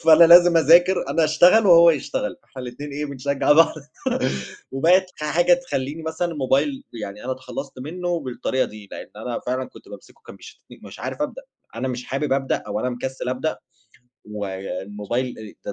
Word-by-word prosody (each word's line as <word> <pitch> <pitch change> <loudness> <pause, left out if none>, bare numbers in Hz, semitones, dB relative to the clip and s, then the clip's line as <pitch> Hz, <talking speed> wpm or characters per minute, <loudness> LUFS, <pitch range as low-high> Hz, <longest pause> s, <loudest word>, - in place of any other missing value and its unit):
فأنا 165 +1 +8
لازم 175 0 +7
أذاكر، 175 +4 +5
أنا 165 -1 +2
أشتغل 180 +7 +5
وهو 170 -1 +8
يشتغل، 145 -8 -3
إحنا 130 -2 -10
الاتنين 125 +4 -7
إيه، 150 +1 -3
بنشجّع 140 +1 0
بعض. 165 +2 +5 1.0
وبقت 175 +7 +3
ح 150 - -6
حاجة 175 - +3
تخلّيني 160 - -4
مثلًا 160 +2 -3
الموبايل 140 0 0 0.2
يعني 105 +3 -8
أنا 130 - -2
اتخلّصت 130 +1 -8
منّه 175 +4 -3
بالطريقة 130 0 -2
دي، 105 -2 -11
لإن - - -9
أنا 120 +2 -5
فعلًا 130 +1 -2
كنت - - -17
بامسكه - - -14
كان - - -11
بيشدن - - -14 0.2
مش - - -11
عارف - - -4
أبدأ، - - -5 0.3
أنا 130 +3 -3
مش 125 0 -5
حابب 140 +1 -2
أبدأ 135 -1 0
أو 105 - -3
أنا 125 - -1
مكسِّل 130 +1 -5
أبدأ 130 +5 -2 0.7
والموبايل 105 +4 -5
آآ 105 -1 -9
140 Hz, 170 wpm, -22 LUFS, 125-165 Hz, 1.0 s, فأنا